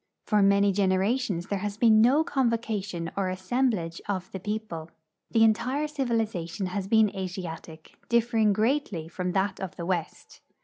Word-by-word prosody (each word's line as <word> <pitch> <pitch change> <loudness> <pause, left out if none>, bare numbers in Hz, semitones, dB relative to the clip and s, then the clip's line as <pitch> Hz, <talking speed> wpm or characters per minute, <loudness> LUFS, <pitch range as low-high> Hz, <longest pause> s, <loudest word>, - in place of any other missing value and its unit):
For 210 -1 +3
many 200 0 +4
generations 195 0 +1
there 200 0 -2
has 205 +1 -4
been 220 -2 +5
no 270 +7 +5
convocation 220 - -1
or 195 -2 0
as 185 0 -4
semblage 190 -5 -1
of 185 -2 -3
the 190 - -5
people. 205 -5 -5 0.4
The 225 - +4
entire 255 +7 +2
civilization 225 - -2
has 185 +1 -3
been 220 -1 +3
Asiatic, 175 -4 -7
differing 230 -2 +3
greatly 215 - 0
from 180 +1 -3
that 195 +1 0
of 190 -1 -5
the 170 - -5
west. 175 -3 -4
200 Hz, 150 wpm, -27 LUFS, 185-225 Hz, 0.4 s, been